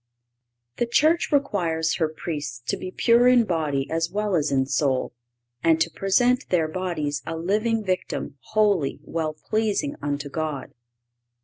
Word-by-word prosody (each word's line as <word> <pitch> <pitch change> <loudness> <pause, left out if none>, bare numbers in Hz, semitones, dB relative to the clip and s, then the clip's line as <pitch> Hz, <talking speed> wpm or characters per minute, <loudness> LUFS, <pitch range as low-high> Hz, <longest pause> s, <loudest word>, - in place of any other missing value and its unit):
The 240 - 0
Church 310 +9 +3
requires 175 - +1
her 160 -2 +1
Priests 145 -6 -5
to - - 0
be 185 - -6
pure 235 +5 +4
in 250 -1 +6
body 155 -8 -1
as 165 0 0
well 210 +2 -1
as 150 -3 +1
in 135 -1 +2
soul, 135 -2 0 0.5
and 165 -1 +4
to 165 +1 +1
"present 245 - +2
their 165 -3 +2
bodies 155 -5 -2
a 165 0 -3
living 215 +6 0
victim, 185 -6 -3
holy, 205 -9 +1
well 160 -2 -3
pleasing 220 - -1
unto 145 0 -2
God." 150 -2 -4
170 Hz, 145 wpm, -24 LUFS, 155-215 Hz, 0.5 s, in